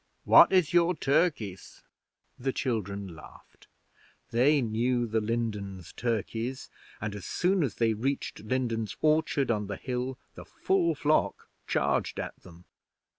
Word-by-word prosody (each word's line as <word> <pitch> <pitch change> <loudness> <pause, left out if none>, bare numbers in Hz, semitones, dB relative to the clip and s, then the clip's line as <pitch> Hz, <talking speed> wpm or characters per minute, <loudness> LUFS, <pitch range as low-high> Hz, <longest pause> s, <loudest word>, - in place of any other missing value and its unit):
What - - +8
is 180 -3 +3
your 175 +1 +4
Turkis?' 140 - -1 0.6
The 135 +2 -1
children 100 -8 -3
laughed. 75 - -16 0.6
They 135 +6 +4
knew 120 +1 0
the 110 -1 0
Lindens 105 -6 -3
turkeys, 115 +2 -3 0.3
and 105 -1 -4
as 100 -2 -8
soon 185 +1 +1
as 140 -7 -1
they 115 -1 +2
reached 135 +6 -2
Lindens 115 -2 -2
orchard 155 -4 +2
on 105 -2 -1
the 100 -1 -4
hill 125 0 -3 0.2
the - - -10
full 170 -4 0
flock 150 +2 +1 0.2
charged - - 0
at - - -5
them. 85 -1 -15
120 Hz, 130 wpm, -28 LUFS, 105-140 Hz, 0.6 s, What